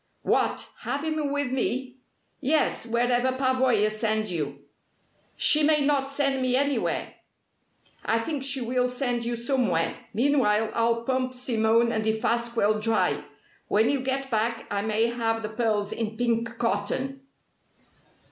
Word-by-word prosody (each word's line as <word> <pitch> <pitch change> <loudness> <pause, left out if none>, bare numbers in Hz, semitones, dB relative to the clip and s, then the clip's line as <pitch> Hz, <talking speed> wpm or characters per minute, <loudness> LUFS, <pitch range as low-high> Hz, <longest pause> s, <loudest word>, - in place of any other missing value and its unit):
"What, - - +1
have 285 +1 -3
him 310 -2 -1
with 285 -2 -1
me?" 260 0 -2 0.4
"Yes, 285 -3 +1
wherever 245 +2 +1
Pavoya 255 -5 +2
sends 215 -1 0
you." 145 -4 -4 0.7
"She 305 - +4
may 300 0 +4
not 275 -1 +1
send 275 -1 0
me 255 -1 +2
anywhere." 280 +1 0 0.9
"I 225 - +1
think 275 +4 -3
she 270 -1 0
will 250 +1 +1
send 245 -1 -2
you 240 0 -1
somewhere. 235 -9 0 0.2
Meanwhile, 225 -3 +2
I'll 230 0 +1
pump 255 0 -1
Simone 230 -2 +2
and 220 -1 -1
Defasquelle 220 -1 +1
dry. 185 -10 +1 0.4
When 220 +5 +3
you 280 - 0
get 265 +1 -2
back 225 +1 0
I 200 0 0
may 220 +1 +1
have 225 -1 -1
the 215 - -3
pearls 220 -2 -1
in 220 -1 -4
pink 230 0 -1
cotton!" 235 +5 -1
235 Hz, 140 wpm, -26 LUFS, 220-265 Hz, 0.9 s, She